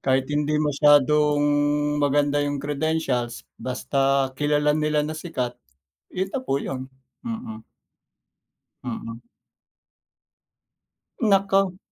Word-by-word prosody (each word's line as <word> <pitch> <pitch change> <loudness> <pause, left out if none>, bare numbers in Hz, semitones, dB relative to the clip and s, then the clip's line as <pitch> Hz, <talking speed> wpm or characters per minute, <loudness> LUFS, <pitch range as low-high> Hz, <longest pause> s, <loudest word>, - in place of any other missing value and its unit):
Kahit 130 0 +1
hindi 150 +1 +1
masyadong 150 0 +4 0.6
maganda 145 0 +2
'yung 145 0 -1
credentials 140 -4 -2 0.2
basta 135 +1 0
kilala 150 +1 +1
nila 150 0 +1
na 155 - -4
sikat, 155 -7 -3 0.6
'yun 190 +1 -2
na 270 - -1
po 255 - -1
'yun, 130 -1 -4 0.4
mm. 110 - -6 1.2
Mm. 115 -1 -6 2.0
Naku! 195 -3 +2
145 Hz, 90 wpm, -24 LUFS, 135-155 Hz, 2.0 s, masyadong